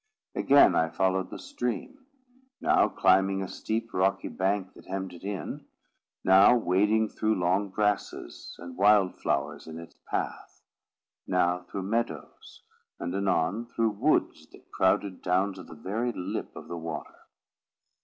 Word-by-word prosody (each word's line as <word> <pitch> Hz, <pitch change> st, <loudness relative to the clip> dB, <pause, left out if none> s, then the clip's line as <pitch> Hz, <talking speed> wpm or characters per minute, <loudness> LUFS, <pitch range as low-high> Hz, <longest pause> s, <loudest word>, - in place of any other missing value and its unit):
Again 140 Hz, +1 st, +6 dB
I 80 Hz, -, +2 dB
followed 95 Hz, +1 st, 0 dB
the -, -, -7 dB
stream; 255 Hz, -, -5 dB, 0.5 s
now 365 Hz, +5 st, +3 dB
climbing 95 Hz, +1 st, +3 dB
a -, -, -4 dB
steep 115 Hz, +4 st, -4 dB
rocky 95 Hz, +1 st, +1 dB
bank 95 Hz, 0 st, -1 dB
that -, -, -16 dB
hemmed 95 Hz, -1 st, -4 dB
it 85 Hz, -, -12 dB
in; 100 Hz, -1 st, -5 dB, 0.6 s
now 95 Hz, +5 st, +7 dB
wading 105 Hz, +2 st, +2 dB
through 110 Hz, 0 st, 0 dB
long 95 Hz, +3 st, +1 dB
grasses 105 Hz, -, -2 dB
and 85 Hz, 0 st, -9 dB
wild 100 Hz, -2 st, +5 dB
flowers -, -, -2 dB
in 80 Hz, 0 st, -7 dB
its 85 Hz, -, -12 dB
path; -, -, -4 dB, 0.6 s
now 90 Hz, -1 st, +2 dB
through 95 Hz, -, -4 dB
meadows; 100 Hz, -, -4 dB, 0.4 s
and 85 Hz, -, -3 dB
anon 100 Hz, +3 st, 0 dB
through 115 Hz, -2 st, 0 dB
woods 125 Hz, +10 st, 0 dB
that -, -, -19 dB
crowded 95 Hz, 0 st, +1 dB
down 95 Hz, +2 st, +1 dB
to 95 Hz, -, -10 dB
the 85 Hz, -, -12 dB
very 110 Hz, +9 st, -2 dB
lip 100 Hz, +1 st, -5 dB
of -, -, -9 dB
the 85 Hz, -, -5 dB
water. 80 Hz, -2 st, -6 dB
95 Hz, 145 wpm, -28 LUFS, 90-110 Hz, 0.6 s, now